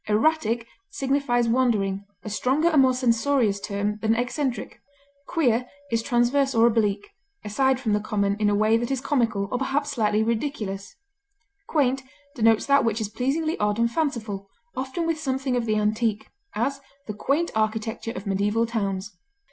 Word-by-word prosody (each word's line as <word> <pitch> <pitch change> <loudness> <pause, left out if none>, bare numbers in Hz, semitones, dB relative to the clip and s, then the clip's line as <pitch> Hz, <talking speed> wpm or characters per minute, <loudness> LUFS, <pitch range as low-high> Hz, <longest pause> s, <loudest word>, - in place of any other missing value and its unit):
Erratic 230 0 +1 0.2
signifies 270 -6 0
wandering, 215 -5 +1 0.2
a 215 - -5
stronger 265 - +2
and 305 -5 +5
more 260 -1 +4
censorious 235 -3 +2
term 205 +1 -2
than 220 0 +2
eccentric. 250 +2 -2 0.5
Queer 250 -7 +1 0.2
is 230 0 +1
transverse 255 +3 +2
or 230 0 +5
oblique, 225 - +1 0.4
aside 265 +5 +2
from 225 -5 0
the 210 - +2
common 200 -1 0
in 210 -1 +2
a 205 - +2
way 215 +2 +3
that 235 +1 -2
is 270 -1 0
comical 230 -7 0
or 250 - -1
perhaps 285 +2 -1
slightly 215 -4 +1
ridiculous. 220 -4 -3 0.7
Quaint 270 -3 +1 0.3
denotes 225 -4 +3
that 280 0 +4
which 225 -1 0
is 215 -2 -2
pleasingly 300 +8 -1
odd 210 0 +1
and 235 0 +2
fanciful, 220 -10 -2 0.3
often 265 +6 -3
with 330 -1 -1
something 265 -3 -1
of 240 -2 -1
the 215 - +2
antique; 215 0 0 0.2
as, 275 +5 -1 0.2
the 210 - -5
quaint 285 +10 0
architecture 220 +1 -1
of 200 - -6
medieval 205 +3 +1
towns. 200 -3 -2
230 Hz, 160 wpm, -25 LUFS, 210-270 Hz, 0.7 s, and